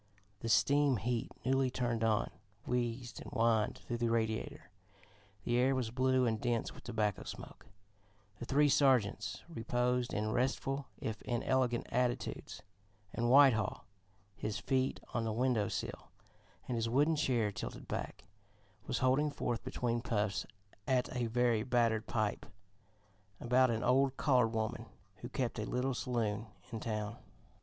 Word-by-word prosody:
The 115 - -4
steam 140 +2 +4
heat, 115 +3 -2
newly 135 0 +2
turned 120 -2 -1
on, 110 -2 +1 0.3
wheezed 120 0 -2
and - - -8
whined 115 -4 +2
through 120 -1 -5
the 120 0 +1
radiator: 110 -3 -2 0.7
the 120 - +1
air 130 +2 +3
was 125 -4 -1
blue 130 0 +2
and 110 -2 0
dense 120 -2 -1
with - - -13
tobacco 105 -4 -1
smoke; - - -9 0.7
the 120 - -5
three 145 +4 +4
sergeants 135 -7 +2
reposed 125 -3 0
in 110 +1 -1
restful, 135 +3 -1
if 110 -1 -4
inelegant 120 0 0
attitudes, 125 0 -2 0.5
and 120 +1 0
Whitehall, 125 -6 +5 0.5
his 105 0 -3
feet 130 +2 0
on 120 - 0
the 110 - -1
window 115 -2 +1
sill - - -4 0.6
and 125 - -1
his 115 0 0
wooden 145 +6 +3
chair 120 -8 +1
tilted - - -7
back, 75 - -4 0.6
was - - -1
holding 140 +4 +3
forth 120 -5 -3
between 120 -1 -1
puffs 105 -4 -1 0.4
at 130 -1 +1
a 120 -2 0
very 120 -1 +2
battered 115 -2 +1
pipe 110 -2 -1 0.9
about 125 +2 +3
an 115 -1 -1
old 135 +1 +3
colored 125 -5 +4
woman 110 -1 -2 0.3
who - - -8
kept - - -2
a - - -1
little 130 +2 -1
saloon 115 -3 -2 0.2
in 115 - -4
town. 105 0 -3
120 Hz, 145 wpm, -34 LUFS, 110-130 Hz, 0.9 s, Whitehall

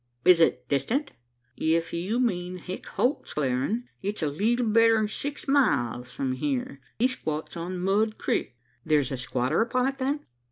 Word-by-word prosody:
"Is 180 -2 +7
it 125 -6 +2
distant?" 240 - 0 0.4
"If 165 +1 0
you 190 +8 -1
mean 180 -7 -1
Hick 180 +1 -7
Holt's 260 +5 -1
Clearin', 140 - 0 0.2
it's 200 -2 -3
a - - +2
leetle 230 - +1
better'n 225 0 +4
six 285 +8 -5
miles 125 - +2
from 130 0 -2
here. 140 0 -2 0.2
He 245 - +4
squats 155 -12 -4
on 175 +2 -4
Mud 205 +4 +1
Crik." 120 - -1 0.3
"There's 150 -4 +2
a 135 - -2
squatter 125 - 0
upon 250 +2 +1
it, 270 0 -2
then?" 280 +3 -1
180 Hz, 160 wpm, -27 LUFS, 145-230 Hz, 0.4 s, Is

